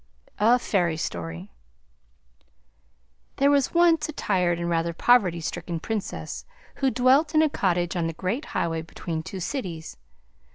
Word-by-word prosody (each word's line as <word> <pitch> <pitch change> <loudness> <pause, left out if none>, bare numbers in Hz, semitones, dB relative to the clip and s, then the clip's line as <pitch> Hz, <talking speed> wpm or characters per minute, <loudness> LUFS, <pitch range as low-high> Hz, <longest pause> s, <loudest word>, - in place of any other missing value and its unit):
A 230 +4 +5
FAIRY 175 -9 0
STORY 85 - -5 1.8
There 280 +1 +3
was 285 +2 +2
once 330 -2 +4
a - - -2
tired 180 - 0
and 170 - -2
rather 170 0 0
poverty 185 -3 +3
stricken 170 +1 -4
Princess 215 +4 -4 0.3
who 270 - +2
dwelt 265 +6 +3
in 310 - +6
a 310 - +3
cottage 175 -5 0
on 170 -2 0
the 165 - -3
great 200 - -3
highway 165 -1 -2
between 160 0 -5
two 190 +4 -7
cities. 175 - -5
185 Hz, 140 wpm, -25 LUFS, 165-255 Hz, 1.8 s, in